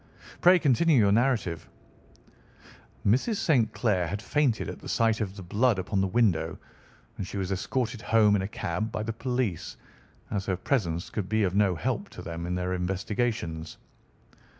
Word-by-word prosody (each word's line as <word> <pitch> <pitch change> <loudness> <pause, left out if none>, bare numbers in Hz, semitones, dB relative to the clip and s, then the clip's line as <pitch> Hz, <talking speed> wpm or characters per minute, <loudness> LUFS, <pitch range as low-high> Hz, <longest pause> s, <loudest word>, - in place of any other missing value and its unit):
"Pray 180 +1 +7
continue 155 0 +3
your 100 -4 +4
narrative." 110 -7 +1 1.4
"Mrs. 130 - +2
St. 130 - +2
Clair 95 -7 0
had 100 +6 -3
fainted 135 -1 0
at - - -6
the - - -9
sight 115 -1 +2
of 100 -2 -3
the 95 - -8
blood 110 +5 +2
upon 95 +1 -1
the 95 - +1
window, 105 -5 +1 0.6
and 95 - -3
she 100 - -6
was 95 -1 -2
escorted 115 +4 -2
home 110 -2 +4
in 100 - +1
a 95 - -2
cab 100 +2 -3
by 110 - -3
the 115 +1 -3
police, 125 -6 -2 0.5
as 100 -2 -2
her 95 -2 0
presence 85 -7 -1
could 100 -4 -3
be 110 0 +2
of 90 -2 0
no 100 -2 +3
help 75 - -2
to - - -10
them 85 +1 -5
in 90 - -1
their 90 0 -2
investigations. 90 -2 -2
105 Hz, 175 wpm, -27 LUFS, 90-115 Hz, 1.4 s, Pray